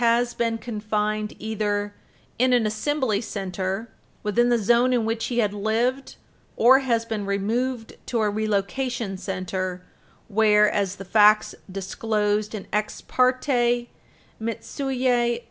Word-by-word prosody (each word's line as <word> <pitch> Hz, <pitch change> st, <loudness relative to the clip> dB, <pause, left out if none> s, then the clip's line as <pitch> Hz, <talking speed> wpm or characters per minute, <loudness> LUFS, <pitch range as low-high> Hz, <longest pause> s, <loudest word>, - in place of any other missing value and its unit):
231 235 Hz, +1 st, +2 dB
been 230 Hz, -1 st, 0 dB
confined 215 Hz, -1 st, -2 dB
either 205 Hz, -1 st, -2 dB, 0.5 s
in 255 Hz, +1 st, +4 dB
an 240 Hz, -3 st, +3 dB
Assembly 220 Hz, 0 st, 0 dB
Center 195 Hz, 0 st, -4 dB, 0.3 s
within 235 Hz, +3 st, +2 dB
the 240 Hz, -, +4 dB
zone 240 Hz, +4 st, +3 dB
in 235 Hz, -3 st, +1 dB
which 225 Hz, 0 st, -1 dB
he 240 Hz, -, -3 dB
had 210 Hz, -4 st, +2 dB
lived 230 Hz, +6 st, -1 dB, 0.4 s
or 260 Hz, +3 st, +6 dB
has 235 Hz, -4 st, 0 dB
been 220 Hz, -2 st, -3 dB
removed 225 Hz, +5 st, -2 dB
to 235 Hz, -, -1 dB
a 215 Hz, -, +2 dB
Relocation 215 Hz, +1 st, -1 dB
Center 185 Hz, -1 st, -4 dB, 0.4 s
where, 210 Hz, 0 st, +4 dB
as 200 Hz, -2 st, 0 dB
the 195 Hz, -, -9 dB
facts 210 Hz, +2 st, +5 dB, 0.2 s
disclosed 210 Hz, +2 st, -1 dB
in 200 Hz, -, -6 dB
Ex 210 Hz, 0 st, -1 dB
parte 250 Hz, -2 st, +1 dB, 0.5 s
Endo 225 Hz, 0 st, -2 dB
(post, -, -, -13 dB
p. 250 Hz, -3 st, +1 dB
220 Hz, 135 wpm, -24 LUFS, 205-240 Hz, 0.5 s, or